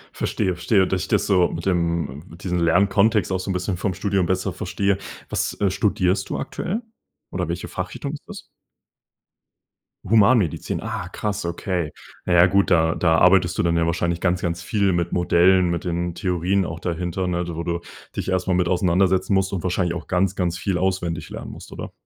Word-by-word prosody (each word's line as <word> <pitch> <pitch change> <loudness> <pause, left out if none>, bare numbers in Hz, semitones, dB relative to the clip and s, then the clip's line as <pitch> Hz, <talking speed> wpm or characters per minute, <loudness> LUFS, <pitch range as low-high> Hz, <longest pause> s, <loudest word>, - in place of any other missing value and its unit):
Verstehe, 95 - -1
verstehe, 95 +2 +2
dass 95 -1 -1
ich - - -5
das - - +1
so 90 -3 +4
mit 85 +2 -6
dem 85 -5 -1
mit 85 +3 -13
diesen 90 -2 -1
Lernkontext 100 +5 +3
auch 95 - 0
so 95 - -5
'n - - +1
bisschen 90 0 -2
vom 95 -2 -2
Studium 95 -3 0
besser 95 0 -1
verstehe. 100 0 -1 0.3
Was, - - -2
äh, 100 -2 +2
studierst 95 -1 +1
du - - -2
aktuell? 220 +6 -3 0.5
Oder - - -2
welche - - -3
Fachrichtung - - -5
ist - - -8
das? - - -8 1.7
Humanmedizin, 110 - +3
ah, 110 -5 -4
krass. 105 -5 -3
Okay. 85 -2 -2 0.3
Na 90 - +1
ja, 85 +1 +7
gut, 100 +1 +2
da 80 -1 +4
da 80 -2 +3
arbeitest 90 -1 +4
du - - +2
dann 85 0 +2
ja 85 - +2
wahrscheinlich 85 +1 0
ganz, 90 -1 0
ganz 85 0 -2
viel 100 +1 +1
mit 85 0 -1
Modellen, 90 +1 +4
mit 85 +1 -2
den 85 0 -2
Theorien 90 +1 0
auch 80 0 -6
dahinter, 90 +1 -2
ne? 90 0 -1
Wo 85 0 -4
du 85 0 -2 0.4
dich - - -3
erst 95 0 0
mal 90 - +2
mit 90 -1 +2
auseinandersetzen 95 +2 +2
musst 95 0 +1
und 90 - -3
wahrscheinlich 90 -1 0
auch 90 - -7
ganz, 95 +1 +1
ganz 85 -2 -1
viel 90 +2 -1
auswendig 90 -2 -1
lernen - - -7
musst, - - -11
oder? - - -7
90 Hz, 195 wpm, -22 LUFS, 85-95 Hz, 1.7 s, ja